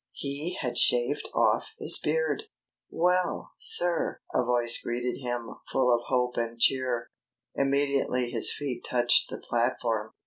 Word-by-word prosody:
He 145 +5 -5
had 125 - 0
shaved 125 +4 +3
off - - 0
his - - +7
beard. 485 -3 -1 0.4
"Well, 180 +1 -1
sir!" 175 -1 +3
a - - +1
voice 120 -1 +1
greeted 120 +1 -4
him 120 -3 -5 0.2
full 125 -2 +2
of 120 - -6
hope 125 -1 -1
and 115 0 -4
cheer, 125 -2 0 0.4
immediately 140 -3 -1
his - - +1
feet 130 -5 -5
touched 120 -1 +3
the - - -6
platform. 115 -2 -2
125 Hz, 135 wpm, -27 LUFS, 120-140 Hz, 0.4 s, his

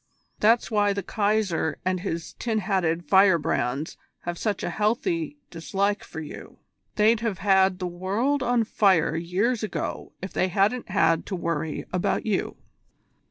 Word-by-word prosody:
That's 230 +3 +3
why 205 -1 +3
the 200 0 -3
Kaiser 200 -7 0
and 185 0 +1
his 165 -2 -4
tin 225 -2 -1
hatted 175 -5 0
firebrands 165 -7 +2 0.2
have 175 0 -4
such 210 +3 -2
a - - -2
healthy 290 - -1
dislike 195 +5 -1
for - - -8
you. 155 -2 -9 0.4
They'd 220 +2 +4
have 225 -4 -2
had 190 -1 +3
the 185 - -4
world 200 +11 -1
on 245 -2 +2
fire 195 -7 +2
years 190 +8 0
ago 215 -5 -4
if 190 - -7
they 185 - +1
hadn't 205 +6 +1
had 165 0 +2
to 195 - -3
worry 165 -3 -3
about 180 - 0
you." 210 -4 -1
195 Hz, 150 wpm, -25 LUFS, 175-215 Hz, 0.4 s, They'd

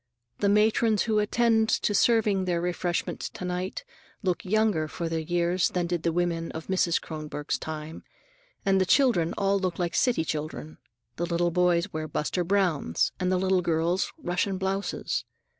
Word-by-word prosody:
The 200 - +2
matrons 215 +1 +3
who 215 -1 +1
attend 220 +1 +2
to 210 - +1
serving 210 -3 +3
the 175 -2 0
refreshments 175 0 -2
to 180 - -7
night 180 - -3 0.4
look 180 -2 0
younger 205 -5 +1
for 170 +2 -4
their 165 0 -1
years 175 +2 +1
than 180 -1 -1
did 170 -1 -2
the 170 - +1
women 170 -1 -1
of 160 0 -6
Mrs. 180 -3 +1
Kronborg's 150 -2 -4
time, 155 0 -6 0.6
and 195 -1 +3
the - - +3
children 230 - +3
all 200 0 +2
look 185 -2 -2
like 175 -2 -1
city 240 -10 +2
children. 155 0 -5 0.4
The 175 - -1
little 170 0 +1
boys 180 +2 +2
wear 155 0 -3
"Buster 155 +4 -1
Browns" 175 - +1
and 185 0 0
the 185 - +2
little 190 0 +2
girls 170 +2 0
Russian 190 - -1
blouses. 195 +1 -2
180 Hz, 165 wpm, -27 LUFS, 170-195 Hz, 0.6 s, matrons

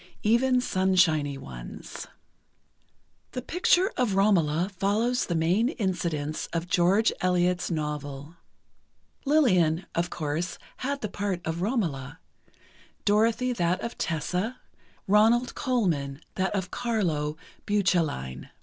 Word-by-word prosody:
Even 250 +4 +3
sunshiny 180 - +2
ones. - - -9 1.3
The 250 - -3
picture 360 +4 +2
of 240 -6 +1
"Romola" 180 -4 +3
follows 215 +6 +1
the 175 - -1
main 180 +9 +2
incidents 170 - -2
of 170 +1 -2
George 195 +4 +3
Eliot's 180 -1 +1
novel. 150 -1 -4 0.9
Lillian, 185 - +3
of 175 +1 0
course, 155 +3 -3 0.2
had 280 +2 -3
the 215 - -1
part 200 -2 -2
of 160 +1 -2
Romola, 165 - -2 0.9
Dorothy 225 +4 +2
that 180 -4 0
of 235 - -4
Tessa, 180 +8 -2 0.5
Ronald 225 +5 +4
Colman 165 - -1
that 190 +2 -1
of 190 -2 -2
Carlo 165 -11 -1 0.3
Bucelline. 165 - 0
185 Hz, 105 wpm, -27 LUFS, 160-220 Hz, 1.3 s, Ronald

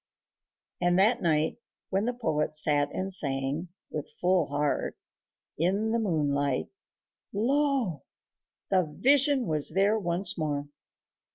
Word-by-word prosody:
And 175 0 +3
that 225 +6 +3
night, 155 -2 +1 0.3
when 195 +2 +1
the 245 - 0
poet 155 -11 -1
sat 145 -1 +3
and 190 +1 -2
sang, 140 +1 0 0.2
with 150 - -5
full 180 0 +2
heart, 145 0 -1 0.6
in 200 +6 +1
the 230 - +1
moonlight 145 - 0 0.6
lo! 255 - 0 0.7
the 190 -1 +4 0.2
vision 275 -1 +3
was 155 -3 +1
there 205 +3 +3
once 180 +1 -1
more.... 145 -2 -2
175 Hz, 115 wpm, -28 LUFS, 150-220 Hz, 0.7 s, the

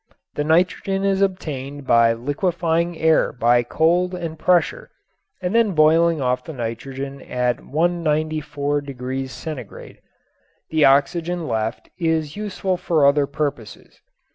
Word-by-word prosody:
The 145 - -2
nitrogen 185 +4 +1
is 195 0 +1
obtained 145 -7 -3
by 115 -2 +4
liquefying 165 +6 -1
air 160 0 +3
by 120 0 +3
cold 175 +8 +1
and 165 -3 -6
pressure 180 - +1 0.5
and 180 +2 -1
then 230 -4 +3
boiling 165 +1 +4
off 125 -1 0
the 160 - -8
nitrogen 135 +3 -5
at 125 -1 -1
194° 145 -5 -2
C. 135 -6 -8 0.7
The 155 -1 +4
oxygen 165 +5 +2
left 110 +1 -3
is 160 -3 0
useful 190 -3 -2
for 165 -4 +2
other 140 0 +4
purposes. 135 -9 -5
155 Hz, 115 wpm, -21 LUFS, 135-175 Hz, 0.7 s, by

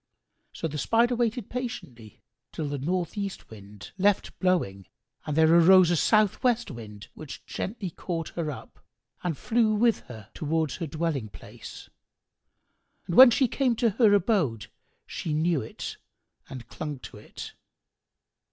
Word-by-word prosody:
So - - -4
the 150 -1 -5
Spider 235 - +2
waited 235 -2 -1
patiently, 130 - -7 0.3
till 155 - -4
the 145 -1 -4
north 175 +4 -2
east 200 - -5
Wind 100 -2 -12
left 200 +1 +1
blowing 130 - 0 0.4
and 150 0 -2
there 160 0 +5
arose 175 +1 +7
a - - +3
south 215 +4 +2
west 240 -5 +1
Wind, 105 -4 -10
which 155 -3 -10
gently 195 -3 -5
caught 165 -1 -4
her 165 -3 -4
up 145 - -9 0.4
and 165 -5 -2
flew 220 - +1
with 230 +1 +3
her 110 -5 -10
towards 155 -1 -1
her 165 - -4
dwelling 150 -6 -2
place; 85 - -11 1.2
and 175 - -4
when 260 -1 +11
she 255 +2 +2
came 250 0 0
to 230 -1 +2
her 220 +1 +4
abode, 170 - 0 0.3
she 155 -3 -4
knew 160 -1 +1
it 110 - -7 0.5
and 125 -3 -9
clung 150 +1 -6
to - - -10
it. - - -10
170 Hz, 150 wpm, -27 LUFS, 140-215 Hz, 1.2 s, when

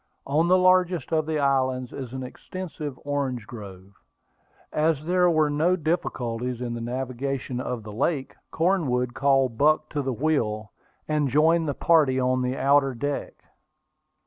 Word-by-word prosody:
On 155 +5 +2
the 185 +1 +5
largest 185 -4 +3
of 155 -1 +1
the 160 -1 0
islands 130 -3 0
is 130 -4 -6
an 130 0 -5
extensive 150 0 -7
orange 135 -5 -2
grove. 100 -4 -10 0.8
As 155 -1 +1
there 180 +1 +3
were 155 -3 +2
no 160 +5 +2
difficulties 125 -8 -2
in 120 -1 -3
the 120 - -5
navigation 130 +1 -3
of 125 -3 -4
the 105 -1 -9
lake, 135 +4 -1 0.2
Cornwood 145 -9 0
called 135 -3 +2
Buck 155 +1 +3
to 145 - -2
the 135 -1 -2
wheel, 115 -6 -1 0.4
and 150 -2 +1
joined 160 +4 +3
the 140 - -2
party 150 -6 +3
on 130 0 +1
the 125 +1 -1
outer 135 -1 +3
deck. 145 +4 -4
140 Hz, 150 wpm, -25 LUFS, 125-155 Hz, 0.8 s, the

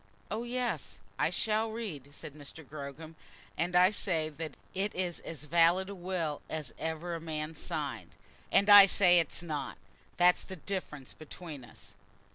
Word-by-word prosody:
"Oh, 220 - -1
yes, 245 +1 -3 0.2
I - - +3
shall 220 +1 0
read," 185 - -6
said 145 0 -9
Mr. 150 +1 -10
Gogram; 150 +2 -8 0.4
"and 175 +1 -1
I 180 +2 +6
say 165 -6 -1
that 155 -1 -7 0.2
it 195 +2 -2
is 180 -2 -1
as 150 -4 -8
valid 170 +5 +3
a - - -5
will 175 -5 -3
as 155 -2 -4
ever 160 +2 -3
a 165 - -4
man 155 -1 -4
signed." 145 -6 -5 0.4
"And 200 - +4
I 205 -1 +11
say 180 -2 +5
it's 165 +1 -2
not. 150 -4 -4 0.4
That's 175 0 +5
the 190 - -8
difference 160 -7 -5
between 155 -2 -9
us." 120 - -15
165 Hz, 160 wpm, -31 LUFS, 150-190 Hz, 0.4 s, I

